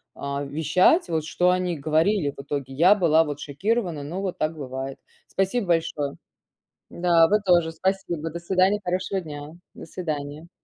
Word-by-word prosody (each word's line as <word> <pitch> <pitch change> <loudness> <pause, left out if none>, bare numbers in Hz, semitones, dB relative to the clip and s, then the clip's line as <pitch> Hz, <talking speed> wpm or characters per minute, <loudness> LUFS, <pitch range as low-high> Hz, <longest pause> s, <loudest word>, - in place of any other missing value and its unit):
а, 140 0 -4
вещать 180 - +3
вот 160 -2 0
что 180 +2 +2
они 180 -2 -1
говорили 155 +2 +1
в - - -8
итоге. 140 -1 -5
Я 180 +9 +5
была 165 -4 +4
вот 145 -2 -5
шокирована, 170 +2 -2
но 175 +7 -5
вот 190 -2 -3
так 155 +1 -1
бывает. 135 -1 -5 0.3
Спасибо 195 +3 -1
большое. 155 -4 0 0.8
Да, 170 -2 +4
вы 210 +3 +3
тоже. 170 -3 +3
Спасибо. 170 -2 -2
До 170 - -6
свидания. 185 +3 +2
Хорошего 185 +2 -1
дня. 150 -3 -8 0.3
До - - -10
свидания. 155 -2 -5
165 Hz, 160 wpm, -24 LUFS, 145-185 Hz, 0.8 s, Я